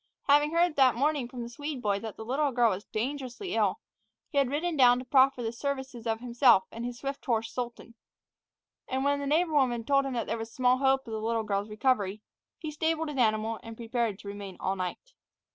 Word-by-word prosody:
Having 295 +2 +4
heard 340 -2 +3
that 260 -3 +5
morning 280 0 +1
from 245 -1 -7
the 235 - -7
Swede 290 +3 -5
boy 205 -4 0
that 220 0 -7
the 220 - -7
little 280 +4 0
girl 240 -2 +3
was 190 +3 -4
dangerously 260 - -4
ill, 210 -4 +1 0.5
he 285 - +1
had 275 -3 +2
ridden 315 +4 -1
down 245 -3 +6
to 255 - -6
proffer 260 -1 +4
the 225 - -2
services 265 -2 -4
of 225 0 -1
himself 240 -4 +4
and 230 - -6
his 245 0 -4
swift 275 +2 -5
horse 225 -3 -1
Sultan. 240 -1 -5 0.9
And 265 0 -1
when 285 0 +2
the 280 - -3
neighbor 320 +3 +2
woman 250 -5 +2
told 275 +3 +2
him 270 - -3
that 235 -2 -1
there 230 - -3
was 225 0 -6
small 255 +1 +2
hope 270 0 +2
of 225 - -6
the 220 - -3
little 225 0 0
girl's 205 0 -2
recovery, 210 -2 0 0.3
he 310 -2 -6
stabled 320 +1 -1
his 290 - -5
animal, 220 -1 +1
and 225 -1 -10
prepared 230 -3 -1
to 200 - -12
remain 200 -2 -7
all 190 - -1
night. 185 - -5
245 Hz, 220 wpm, -29 LUFS, 225-280 Hz, 0.9 s, down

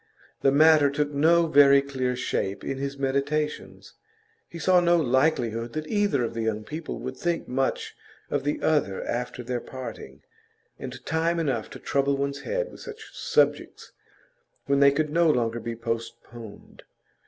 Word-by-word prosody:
The 135 - +4
matter 155 0 +6
took 145 +1 -1
no 165 +4 +4
very 140 -3 +6
clear 130 -2 -2
shape 100 -5 -2
in 135 - -4
his 140 0 -4
meditations; 140 +3 -2 0.6
he 170 - -9
saw 180 +2 +4
no 175 0 +3
likelihood 120 -5 +1
that 155 0 -4
either 200 - +1
of 115 - -3
the 115 - -3
young 110 -1 -2
people 155 +5 -6
would 130 - -6
think 170 +4 -2
much 135 +1 -2 0.4
of 145 -2 0
the 145 +1 -2
other 145 -11 +1
after 125 +1 -4
their 120 0 -3
parting, 115 - -9 0.6
and 130 -1 -8
time 165 +2 0
enough 130 -9 -1
to - - -10
trouble 140 0 0
one's 140 0 -3
head - - -3
with - - -13
such 445 -2 -10
subjects - - 0 0.7
when 140 0 +2
they 140 0 +6
could 150 +1 -1
no 170 +1 +3
longer 120 -4 +1
be 115 0 -5
postponed. 115 -1 -7
140 Hz, 160 wpm, -26 LUFS, 125-155 Hz, 0.7 s, matter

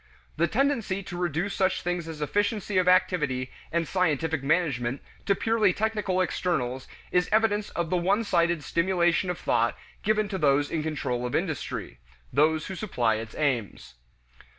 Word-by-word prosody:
The 170 +2 +2
tendency 230 -6 0
to 175 - -7
reduce 175 +2 -1
such 190 -1 +1
things 175 -1 -2
as 155 -2 -5
efficiency 205 +3 0
of 180 - +1
activity 150 -9 +2 0.2
and 165 -1 0
scientific 160 -4 0
management 135 -5 0 0.3
to 200 - +4
purely 220 -4 +2
technical 210 -3 0
externals 130 -9 -1 0.2
is 180 0 +2
evidence 215 -1 +2
of 170 -1 -3
the 180 - +3
one 195 +6 +2
sided 170 -5 +1
stimulation 175 +1 +1
of 180 - -2
thought 115 +1 +1 0.2
given 215 0 +1
to 190 -2 -3
those 145 -1 +2
in 160 - 0
control 140 -6 -2
of 125 - -2
industry 155 - -3 0.3
those 155 +1 +3
who 190 - -5
supply 120 - 0
its 110 0 -7
aims. 115 - -2
170 Hz, 155 wpm, -27 LUFS, 145-195 Hz, 0.3 s, to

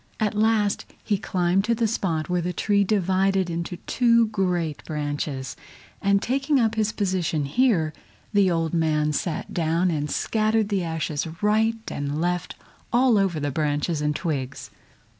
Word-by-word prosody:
At 215 -2 +1
last 215 -1 +1 0.2
he 205 -3 0
climbed 185 -2 +1
to 235 +1 +2
the 230 0 +1
spot 175 -8 -1
where 180 -1 0
the 180 +1 -2
tree 200 +3 +2
divided 190 -2 +1
into 170 +1 -4
two 235 -2 +3
great 175 -7 -1
branches, 145 -3 -3 0.5
and 200 0 +2
taking 275 +3 +1
up 225 -2 +2
his 215 -1 0
position 180 -8 -1
here, 170 - +2 0.4
the 200 -2 +4
old 165 -2 0
man 155 -2 +1
sat 155 +2 -3
down 170 +2 +1
and 150 -2 -2
scattered 215 +2 +1
the 195 -3 0
ashes 160 -2 -2 0.2
right 220 +2 +3 0.2
and 145 +1 -3
left 175 +1 -1 0.4
all 245 0 +4
over 190 -5 +1
the 145 -1 -2
branches 150 +2 -1
and 150 0 0
twigs. 140 -6 -4
180 Hz, 155 wpm, -24 LUFS, 155-210 Hz, 0.5 s, the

